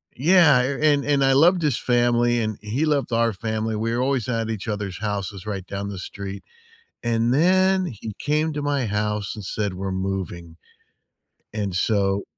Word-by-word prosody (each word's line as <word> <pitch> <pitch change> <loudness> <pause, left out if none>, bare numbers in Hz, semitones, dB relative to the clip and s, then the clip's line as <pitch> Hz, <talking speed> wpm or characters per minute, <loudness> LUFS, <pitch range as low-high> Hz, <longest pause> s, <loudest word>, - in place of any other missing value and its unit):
Yeah, 155 -2 +5
a 135 +2 -2
and 140 -1 -1
and 145 -1 +2
I 135 - +4
loved 170 +6 +5
his 150 -6 +1
family, 120 -1 +2
and 110 -2 -2
he 115 +9 -1
loved 145 -4 0
our 115 -1 +2
family, 110 +2 -3
we 115 +2 -1
were 120 - 0
always 130 -2 0
at 115 -2 -1
each 110 -1 -4
other's 105 -4 -4
houses 100 -2 -4
right 100 -3 -4
down 100 +1 -5
the 100 -2 -6
street, 100 +1 -7 0.6
and 115 0 +1
then 185 +5 +3
he 110 - -7
came 155 +1 0
to 150 - -3
my 145 -3 0
house 105 0 -2
and 105 - -8
said, 105 0 -2
"We're 95 +1 -4
moving," 95 -3 -4 1.0
and 100 -4 -3
so 100 0 +1
115 Hz, 180 wpm, -23 LUFS, 100-140 Hz, 1.0 s, Yeah